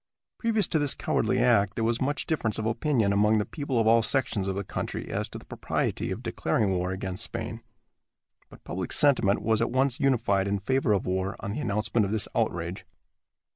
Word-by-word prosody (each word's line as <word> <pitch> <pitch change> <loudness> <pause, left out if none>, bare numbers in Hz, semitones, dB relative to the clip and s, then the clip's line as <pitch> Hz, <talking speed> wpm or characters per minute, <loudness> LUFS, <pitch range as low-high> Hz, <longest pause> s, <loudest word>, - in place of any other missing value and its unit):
Previous 225 -4 +1
to 160 - +2
this 145 -2 +2
cowardly 125 - 0
act 115 -5 +3
there 115 - -1
was 115 +1 0
much 145 +3 -1
difference 125 - -1
of 110 - -3
opinion 115 -2 +1
among 105 +2 +3
the 105 - 0
people 140 0 -3
of 115 - +2
all 115 +1 +5
sections 110 -3 0
of 95 - -1
the 100 - -2
country - - -5
as - - -2
to - - -8
the - - -13
propriety - - -2
of - - -5
declaring 105 -3 0
war 90 -1 -1
against 95 -1 -3
Spain, 115 0 -5 0.9
but - - -16
public 90 -1 -5
sentiment 125 -9 +3
was 110 0 +1
at 115 - +1
once 130 -1 +1
unified 115 -8 +2
in 100 0 0
favor 125 +4 0
of 100 -3 +1
war 95 +3 -1
on 100 - -4
the 110 - -4
announcement 105 -2 0
of 100 - -2
this 110 -2 +1
outrage. - - -2
110 Hz, 205 wpm, -27 LUFS, 100-130 Hz, 0.9 s, all